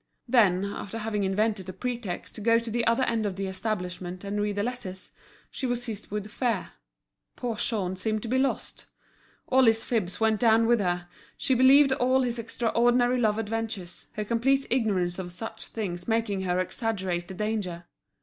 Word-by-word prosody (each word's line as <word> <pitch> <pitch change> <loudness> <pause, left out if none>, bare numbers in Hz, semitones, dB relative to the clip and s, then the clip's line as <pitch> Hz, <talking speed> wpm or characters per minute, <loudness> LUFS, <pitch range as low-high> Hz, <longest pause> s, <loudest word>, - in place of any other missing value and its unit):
Then 200 -6 +4
after 200 +1 -5
having 215 -2 -1
invented 195 -1 0
a - - -5
pretext 235 -2 -4
to 215 - -7
go 230 +2 +4
to 230 -1 -3
the 235 +1 0
other 230 +3 +3
end 225 -3 0
of 195 - -3
the 195 +1 -3
establishment 185 -2 -4
and 205 +1 -2
read 205 -1 -1
the 205 - 0
letters, 205 -6 -6 0.4
she 265 - -3
was 245 0 0
seized 220 -4 -5
with 210 0 -4
fear; 230 -6 -1 0.6
poor 240 -2 -3
Jean 195 -4 -1
seemed 215 +3 -1
to - - -4
be 260 +3 +1
lost. 270 0 -2 0.6
All 260 0 +5
his 225 0 +4
fibs 200 -7 -1
went 220 -1 +2
down 225 -1 +5
with 235 0 +4
her, 175 -2 -1 0.3
she 265 - +1
believed 265 +2 +6
all 260 +1 +2
his 240 -1 -1
extraordinary 240 +2 +2
love 215 -3 +2
adventures, 225 -4 -4
her 210 - -3
complete 265 +5 +2
ignorance 195 -8 +1
of 180 -1 -5
such 225 +6 -6
things 175 -5 -4
making 225 -4 0
her 180 -1 0
exaggerate 185 -2 -2
the 190 - -8
danger. 200 -4 -2
220 Hz, 180 wpm, -27 LUFS, 190-235 Hz, 0.6 s, believed